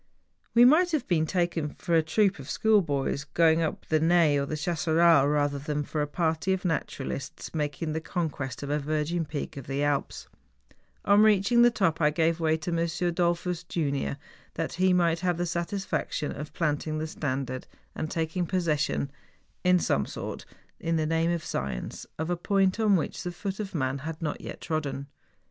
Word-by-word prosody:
We 240 Hz, +1 st, +8 dB
might 335 Hz, +6 st, +5 dB
have 285 Hz, -6 st, 0 dB
been 160 Hz, -3 st, +2 dB
taken 170 Hz, -4 st, -1 dB
for 170 Hz, -, -3 dB
a 165 Hz, -, +6 dB
troop 190 Hz, +4 st, +1 dB
of 135 Hz, -, -9 dB
school 220 Hz, -2 st, +4 dB
boys 140 Hz, -3 st, -1 dB
going 160 Hz, +2 st, +3 dB
up 160 Hz, -, -2 dB
the 155 Hz, -, +2 dB
Naye 165 Hz, -2 st, +4 dB
or 140 Hz, 0 st, 0 dB
the 155 Hz, -, -3 dB
Chasseral 165 Hz, -2 st, +3 dB
rather 145 Hz, -1 st, +1 dB
than 150 Hz, +1 st, -2 dB
for 150 Hz, +1 st, -3 dB
a 150 Hz, -, 0 dB
party 160 Hz, +4 st, 0 dB
of 190 Hz, 0 st, -3 dB
naturalists 140 Hz, -5 st, -3 dB
making 155 Hz, +1 st, -2 dB
the 160 Hz, -, -2 dB
conquest 145 Hz, -, -3 dB
of 140 Hz, -, -3 dB
a 150 Hz, -, +1 dB
virgin 155 Hz, +3 st, -1 dB
peak 145 Hz, -1 st, -5 dB
of 135 Hz, -, -8 dB
the 140 Hz, +2 st, -1 dB
Alps. 145 Hz, -1 st, -1 dB, 0.8 s
On 200 Hz, +1 st, +6 dB
reaching 215 Hz, +2 st, +5 dB
the 240 Hz, -, +7 dB
top 190 Hz, -8 st, 0 dB
I 150 Hz, -, +5 dB
gave 160 Hz, +2 st, +1 dB
way 160 Hz, -1 st, +2 dB
to 160 Hz, +3 st, -4 dB
M. 170 Hz, -, 0 dB, 0.4 s
Dollfus, 175 Hz, 0 st, 0 dB
junior, 140 Hz, -4 st, -1 dB, 0.4 s
that 165 Hz, 0 st, -2 dB
he 185 Hz, +1 st, +3 dB
might 170 Hz, -2 st, +3 dB
have 180 Hz, -1 st, 0 dB
the 175 Hz, -, 0 dB
satisfaction 170 Hz, -2 st, -2 dB
of 150 Hz, +1 st, -7 dB
plant¬ 150 Hz, -2 st, -1 dB
ing 155 Hz, 0 st, -2 dB
the 155 Hz, -, -2 dB
standard 130 Hz, -4 st, -3 dB, 0.3 s
and 155 Hz, -, -4 dB
taking 165 Hz, +1 st, -1 dB
possession, 155 Hz, -6 st, 0 dB, 0.5 s
in 180 Hz, 0 st, +5 dB
some 70 Hz, -, +1 dB
sort, -, -, -6 dB, 0.3 s
in 165 Hz, 0 st, -1 dB
the 155 Hz, -1 st, +1 dB
name 165 Hz, +1 st, +1 dB
of 170 Hz, -2 st, -1 dB
Science, 65 Hz, -3 st, -4 dB
of 160 Hz, +3 st, -2 dB
a -, -, +2 dB
point 195 Hz, +3 st, +1 dB
on 215 Hz, -3 st, +4 dB
which 170 Hz, -, -2 dB
the 180 Hz, -, -4 dB
foot 190 Hz, +3 st, -5 dB
of 200 Hz, -3 st, -5 dB
man 135 Hz, -2 st, -1 dB
had 155 Hz, +3 st, -6 dB
not 155 Hz, -3 st, -3 dB
yet -, -, -8 dB
trodden. 145 Hz, -3 st, -3 dB
160 Hz, 190 wpm, -27 LUFS, 150-180 Hz, 0.8 s, We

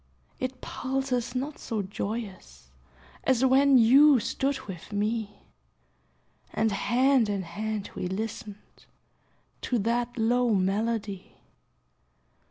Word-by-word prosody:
It 255 Hz, 0 st, -4 dB
pulses 255 Hz, -2 st, -2 dB
not 280 Hz, +4 st, -3 dB
so 220 Hz, -4 st, -3 dB
joyous 190 Hz, -, -6 dB, 0.5 s
As 260 Hz, 0 st, +3 dB
when 270 Hz, +1 st, +5 dB
you 265 Hz, +4 st, +7 dB
stood 265 Hz, +5 st, -1 dB
with 185 Hz, -2 st, -9 dB
me, 210 Hz, 0 st, -2 dB, 1.1 s
And 220 Hz, 0 st, +1 dB
hand 245 Hz, +3 st, +2 dB
in 200 Hz, -2 st, -1 dB
hand 210 Hz, +4 st, -4 dB
we -, -, -3 dB
listened 210 Hz, +1 st, -7 dB, 0.7 s
To 245 Hz, -, -1 dB
that 235 Hz, +3 st, -1 dB
low 240 Hz, 0 st, +2 dB
melody. 200 Hz, +1 st, -2 dB
225 Hz, 100 wpm, -27 LUFS, 205-255 Hz, 1.1 s, you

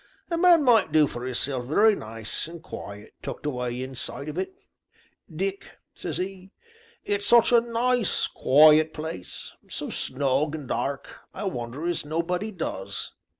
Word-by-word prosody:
A 335 Hz, -, +1 dB
man 345 Hz, -3 st, +6 dB
might 230 Hz, -, +4 dB
do 155 Hz, -1 st, +5 dB
for 125 Hz, -2 st, -5 dB
'isself 130 Hz, 0 st, -2 dB
very 205 Hz, -, +4 dB
nice, 110 Hz, -, -4 dB
and 165 Hz, 0 st, -10 dB
quiet, 105 Hz, -, -9 dB
tucked -, -, -7 dB
away 125 Hz, -3 st, -2 dB
inside 135 Hz, +2 st, -5 dB
of 150 Hz, -, -6 dB
it, 380 Hz, -, -6 dB, 0.7 s
Dick,' 195 Hz, +4 st, -4 dB, 0.2 s
says -, -, -4 dB
'e; 190 Hz, 0 st, -5 dB, 0.6 s
'it's 205 Hz, 0 st, 0 dB
such 235 Hz, 0 st, +6 dB
a 235 Hz, -1 st, +6 dB
nice, 240 Hz, -1 st, +1 dB
quiet 155 Hz, +3 st, +5 dB
place, 155 Hz, -, -6 dB, 0.2 s
so -, -, -5 dB
snug 140 Hz, +3 st, 0 dB
and 150 Hz, -4 st, -7 dB
dark, 140 Hz, +4 st, -3 dB, 0.2 s
I -, -, -5 dB
wonder 125 Hz, -4 st, -4 dB
as 175 Hz, -1 st, 0 dB
nobody 170 Hz, +7 st, -2 dB
does. 100 Hz, -, -4 dB
155 Hz, 150 wpm, -26 LUFS, 130-200 Hz, 0.7 s, man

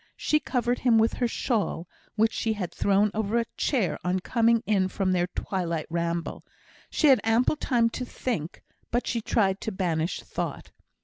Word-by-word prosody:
She 305 Hz, -, +2 dB
covered 245 Hz, -4 st, -1 dB
him 240 Hz, -3 st, +4 dB
with 225 Hz, +1 st, +3 dB
her 245 Hz, -, 0 dB
shawl, 215 Hz, -8 st, -1 dB, 0.3 s
which 220 Hz, +1 st, +2 dB
she 225 Hz, -, 0 dB
had 185 Hz, -5 st, -4 dB
thrown 200 Hz, +1 st, +2 dB
over 220 Hz, +1 st, 0 dB
a 235 Hz, -, +1 dB
chair 235 Hz, -, 0 dB
on 180 Hz, +1 st, 0 dB
coming 230 Hz, +3 st, +2 dB
in 195 Hz, -3 st, +2 dB
from 190 Hz, 0 st, -1 dB
their 175 Hz, -1 st, +1 dB
twilight 175 Hz, -3 st, -3 dB
ramble. 170 Hz, 0 st, -2 dB, 0.5 s
She -, -, 0 dB
had 270 Hz, -4 st, +6 dB
ample 225 Hz, +6 st, +3 dB
time 240 Hz, -6 st, +2 dB
to 255 Hz, -, -4 dB
think; 230 Hz, -10 st, -4 dB, 0.3 s
but 240 Hz, +1 st, 0 dB
she 235 Hz, -, -1 dB
tried 200 Hz, -3 st, +1 dB
to 220 Hz, -, -3 dB
banish 175 Hz, -4 st, -1 dB
thought. -, -, -5 dB
215 Hz, 175 wpm, -26 LUFS, 185-235 Hz, 0.5 s, had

